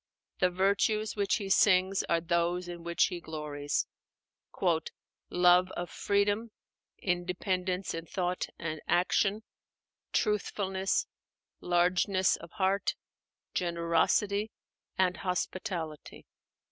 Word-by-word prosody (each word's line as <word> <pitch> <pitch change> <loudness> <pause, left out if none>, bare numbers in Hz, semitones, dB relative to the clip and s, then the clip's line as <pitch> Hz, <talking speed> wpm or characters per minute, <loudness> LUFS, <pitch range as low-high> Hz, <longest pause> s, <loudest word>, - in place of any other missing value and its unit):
The 180 - +4
virtues 200 +3 +1
which 200 -2 +1
he 200 -3 -3
sings 190 -1 +4
are 170 - +3
those 170 +1 0
in 175 -1 -7
which 170 0 +2
he 180 -2 -5
glories, 150 -2 -2 1.4
"love 180 +1 +5
of 175 0 -4
freedom, 205 +3 +1 0.5
independence 180 +1 -1
in 165 0 -5
thought 180 0 -2
and 160 -2 -4
action, 195 +4 +2 0.7
truthfulness, 195 -2 0 0.5
largeness 180 +2 +2
of 170 - -11
heart, 195 0 +1 0.6
generosity, 180 +5 +1 0.5
and 185 -1 +2
hospitality." 180 -4 -4
180 Hz, 95 wpm, -30 LUFS, 170-195 Hz, 1.4 s, love